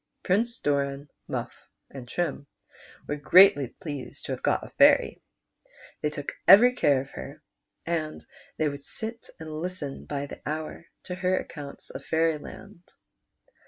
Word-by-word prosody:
Prince 230 +6 +1
Doran, 140 0 -1 0.2
Mufif, - - -3 0.4
and 130 -3 -9
Trim 145 -3 -2 0.6
were 145 - -2
greatly 145 -2 +6
pleased 145 +1 -8
to - - -4
have - - -4
got - - +1
a - - -11
fairy. - - +4 0.8
They 150 - +1
took 145 -1 -5 0.2
every 235 +7 +9
care 140 - +3
of 135 - -11
her, - - -9 0.4
and 160 -2 -3 0.3
the\' 155 -1 +1
would 140 0 -8
sit 225 +7 -7
and 155 -1 -6
listen 175 -6 -5
by 140 -1 -3
the - - -10
hour 155 +2 -5 0.2
to 180 - -6
her 185 0 +1
accounts 145 -3 -7
of 140 - -8
Fairyland. 165 +5 -2
155 Hz, 145 wpm, -27 LUFS, 140-180 Hz, 0.8 s, every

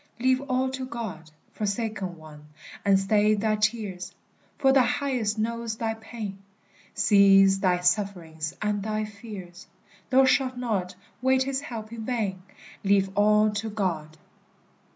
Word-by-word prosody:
Leave 260 +1 +2
all 255 +1 +1
to 265 0 -5
God, 200 -11 -6 0.2
Forsaken 205 -4 -3
one, 150 -1 -13 0.4
and 195 -1 +4
stay 210 +2 +3
thy 215 +1 +1
tears; 210 -4 -2 0.4
For 270 -2 +4
the 270 - +6
Highest 245 -4 0
knows 230 0 -2
thy 225 -1 -1
pain, 220 -3 -7 0.6
Sees 195 -1 +5
thy 180 -2 +2
sufferings 180 -5 -1
and 210 -1 0
thy 215 +1 -2
fears; 200 -4 -10 0.4
Thou 265 0 +5
shalt 260 -1 +2
not 210 -7 -2 0.3
wait 260 0 +3
his 270 0 -2
help 225 -4 -7
in 225 -1 -6
vain; 215 -6 -2 0.4
Leave 195 -1 +3
all 210 +1 +4
to 210 +2 -3
God! 170 -7 -3
210 Hz, 135 wpm, -26 LUFS, 195-235 Hz, 0.6 s, the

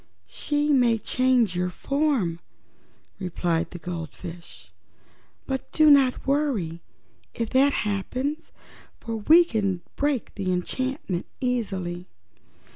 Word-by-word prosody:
"She 295 0 0
may 245 -4 +4
change 245 -3 +2
your 180 0 0
form," 265 - 0 0.8
replied 175 -2 -1
the 180 - -8
goldfish, 170 0 -8 0.7
"but 265 -1 -4
do 310 -1 +6
not 270 -3 +4
worry 255 - 0 0.5
if 230 -1 -3
that 270 +2 +5
happens, 255 +10 -3 0.5
for 230 -1 -4
we 320 +11 +6
can 200 - -1
break 285 -4 -1
that 195 -2 -4
enchantment 185 - -2
easily. 190 -9 -2
225 Hz, 105 wpm, -25 LUFS, 180-275 Hz, 0.8 s, do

